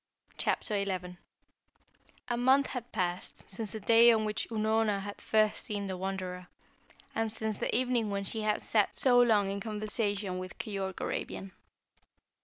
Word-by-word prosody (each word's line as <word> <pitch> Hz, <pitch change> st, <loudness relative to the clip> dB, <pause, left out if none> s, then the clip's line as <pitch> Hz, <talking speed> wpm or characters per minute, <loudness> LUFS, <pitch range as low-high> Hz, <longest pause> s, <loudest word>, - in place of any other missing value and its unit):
CHAPTER 205 Hz, -3 st, 0 dB
XI 180 Hz, -2 st, -4 dB, 1.1 s
A 240 Hz, -, 0 dB
month 260 Hz, +3 st, +4 dB
had 245 Hz, -2 st, -6 dB
passed 180 Hz, -3 st, -3 dB
since 210 Hz, +2 st, -5 dB
the 220 Hz, -, -5 dB
day 230 Hz, +3 st, +7 dB
on 220 Hz, -1 st, +2 dB
which 210 Hz, 0 st, -1 dB
Unorna 220 Hz, -2 st, +1 dB
had 205 Hz, +1 st, -7 dB
first 215 Hz, -1 st, +2 dB
seen 205 Hz, -1 st, -3 dB
the 190 Hz, -1 st, -3 dB
Wanderer, 185 Hz, -1 st, -4 dB, 0.7 s
and 225 Hz, -1 st, 0 dB
since 220 Hz, -1 st, 0 dB
the -, -, -1 dB
evening 245 Hz, -4 st, +1 dB
when 200 Hz, 0 st, -2 dB
she 220 Hz, +3 st, -2 dB
had 215 Hz, 0 st, 0 dB
sat 210 Hz, -3 st, +1 dB
so 245 Hz, -2 st, +5 dB
long 210 Hz, -5 st, +3 dB
in 200 Hz, -, -3 dB
conversation 210 Hz, -2 st, -2 dB
with 185 Hz, -1 st, -8 dB
Keyork 195 Hz, -3 st, -4 dB
Arabian. 195 Hz, -, -4 dB
210 Hz, 155 wpm, -31 LUFS, 195-225 Hz, 1.1 s, day